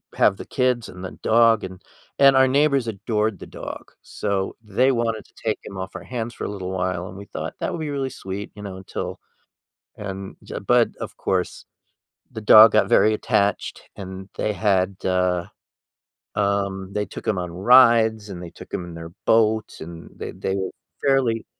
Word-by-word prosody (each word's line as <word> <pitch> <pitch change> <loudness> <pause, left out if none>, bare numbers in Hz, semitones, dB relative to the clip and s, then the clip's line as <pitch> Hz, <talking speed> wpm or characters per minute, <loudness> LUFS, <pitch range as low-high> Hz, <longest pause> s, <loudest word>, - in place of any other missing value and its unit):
have 100 -1 +4
the - - -8
kids 125 -3 0
and 90 +1 -10
the - - -6
dog, 115 -2 +4
and 95 -1 -9 0.4
and 135 -1 +8
our 130 0 +6
neighbors 140 -2 +3
adored 105 -1 -1
the - - -9
dog, - - -8
so 100 -2 -2
they 125 +6 +2
wanted 115 -3 -1
to - - -26
take 110 - +1
him 100 - -9
off 95 0 -6
our - - -6
hands 120 -2 -4
for - - -6
a - - -3
little 95 -3 -5
while, 90 -1 -2
and 90 - -10
we 100 - -8
thought 80 -3 -6
that - - -2
would 170 - -4
be 150 - -3
really 135 -2 -2
sweet, 100 -4 -6
you 105 - -10
know, 95 -2 -6
until 95 - -6 0.8
and 95 -1 -6
j - - -7
but, - - +3
of - - -6
course, 95 -1 -2 0.7
the 110 - -6
dog 110 +1 +9
got - - +3
very 110 - +5
attached, 100 -1 -1
and 95 0 -8
they 105 - 0
had, 95 0 +1
uh, 90 -1 +1 0.9
um, 100 -1 -1
they 105 0 -1
took - - -9
him 100 -4 +1
on 90 -1 -3
rides, 110 0 +5
and 90 -2 -7
they 85 - -8
took - - -13
him 90 - -3
in 85 - -9
their 85 0 -7 0.2
boats, 110 -1 +2
and 85 +1 -9
they - - -5
they 95 - -3
were 95 -1 -2 0.3
fairly 130 -5 +2
100 Hz, 190 wpm, -23 LUFS, 95-115 Hz, 0.9 s, dog